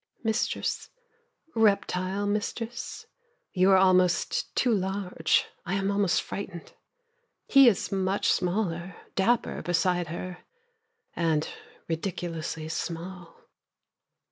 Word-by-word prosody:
Mistress, 220 -1 -1 0.6
reptile 200 -2 +1
mistress, 220 +3 -3 0.5
You 185 0 +4
are 190 - +7
almost 185 -2 +3
too 245 -2 +3
large, 190 -4 +1 0.2
I 180 - -2
am 195 0 0
almost 200 -3 +2
frightened. 175 -4 -7 0.7
He 275 -2 +7
is 225 - +2
much 195 0 +1
smaller, 180 -1 -1 0.2
Dapper 235 +5 +1
beside 175 0 +1
her, 175 +2 -6 0.8
And 160 -2 +1 0.4
ridiculously 165 -2 -3
small. 170 +1 -6
185 Hz, 90 wpm, -28 LUFS, 175-200 Hz, 0.8 s, are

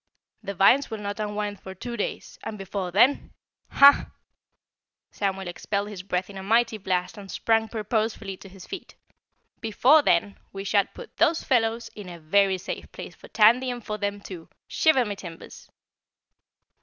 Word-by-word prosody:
"The 200 -2 -6
vines 245 +10 +4
will 220 - -4
not 205 0 -5
unwind 210 -1 -3
for 190 0 -9
two 235 +5 -6
days 210 - -5
and 220 -1 -5
before 195 -1 -4
THEN 240 +10 +3 0.4
HAH!" 280 0 +7 1.0
Samuel 195 -2 -2
expelled 200 +3 -3
his 200 -4 -7
breath 180 -1 -2
in 195 -1 -9
a - - -6
mighty 225 +2 +2
blast 185 0 -2
and 195 -1 -11
sprang 225 +2 +1
purposefully 220 -2 -2
to 195 - -13
his 185 -1 -13
feet. 385 - -9 0.6
"Before 245 +7 +4
then 200 -4 +1
we 195 0 -6
shall 200 0 +2
put - - -13
those 330 - +2
fellows 230 -3 +1
in 205 -4 -9
a 170 -1 -9
very 190 +4 +2
safe 185 - -7
place - - -9
for - - -15
Tandy 235 +4 +4
and 245 -2 -6
for 215 0 -4
them 205 0 -3
too, 180 -5 -10 0.2
shiver 290 -6 +3
my 205 - -3
timbers!" 175 -4 -11
205 Hz, 170 wpm, -25 LUFS, 195-225 Hz, 1.0 s, HAH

